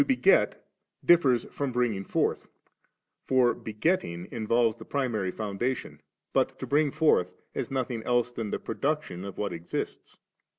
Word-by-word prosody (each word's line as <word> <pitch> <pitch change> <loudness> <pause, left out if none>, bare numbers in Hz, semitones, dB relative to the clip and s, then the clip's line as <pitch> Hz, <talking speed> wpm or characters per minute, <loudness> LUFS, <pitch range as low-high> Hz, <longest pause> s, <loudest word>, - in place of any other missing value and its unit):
beget 270 +8 +3 0.4
differs 140 -9 +5
from 140 -2 -2
bringing 120 -5 0
forth; - - 0 0.8
for 125 -2 +4
begetting 105 - -1
involves 115 0 +2
the - - -10
primary 120 -9 -1
foundation, 110 +6 -3 0.3
but - - +1
to - - -5
l»iog 145 0 +2
forth 150 - +3 0.2
is - - -3
nothing 130 -3 -2
else 120 +1 +1
Uian 115 -3 -3
the - - -1
production 140 - -2
of 100 -1 -7
what 105 - -2
exists. 85 0 -5
120 Hz, 135 wpm, -28 LUFS, 105-140 Hz, 0.8 s, differs